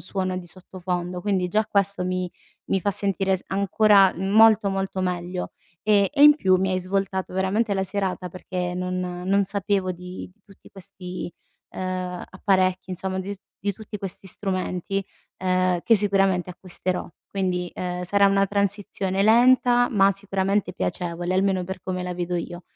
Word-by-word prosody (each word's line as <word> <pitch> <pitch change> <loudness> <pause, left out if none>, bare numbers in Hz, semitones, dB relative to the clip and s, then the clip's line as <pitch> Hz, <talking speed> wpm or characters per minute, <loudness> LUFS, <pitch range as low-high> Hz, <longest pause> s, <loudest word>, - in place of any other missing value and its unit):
suono 185 -1 -2
di 175 - -9
sottofondo. 180 0 -5
Quindi, 185 -2 0
già 215 +3 +1
questo 200 -2 0
mi 185 -1 -2 0.4
mi 195 - +2
fa 200 - 0
sentire 195 -1 0
s - - -14
ancora 200 0 +4
molto, 205 +2 +5
molto 195 0 -2
meglio. 180 0 -3 0.3
Ehm, 205 -2 +4
e 290 - +4
in 295 0 +9
più 190 -9 +3
mi 190 0 0
hai 185 - +1
svoltato 190 0 -2
veramente 200 +3 0
la 190 - 0
serata, 190 -2 -3
perché 180 0 -4
non 180 0 -2 0.3
non 200 +1 +3
sapevo 195 -1 -1
di 180 +1 -9
di 205 - -40
tutti 195 - -18
questi, 180 -2 -8 0.4
uhm, 185 -1 -4
apparecchi, 185 -1 +1
insomm 185 +1 -3
di 195 +2 -4
t 190 - -23 0.2
di 200 +1 -1
tutti 210 +1 -8
questi 195 0 -7
strumenti, 190 0 -3 0.3
uhm, 185 -1 +1
che 225 -2 +5
sicuramente 195 -3 +2
acquisterò. 180 0 -4 0.2
Quindi, 180 -2 -1
uhm, 180 0 -3
sarà 200 +2 +4
una 195 0 +3
transizione 200 -1 -1
lenta, 245 +1 +5
ma 195 -3 +4
sicuramente 195 -1 -1
piacevole, 175 0 -3
almeno 190 -1 +1
per 190 +1 -6
come 185 -1 -3
la 180 0 -4
vedo 175 0 -2
io. 175 +1 -5
190 Hz, 160 wpm, -24 LUFS, 180-200 Hz, 0.4 s, in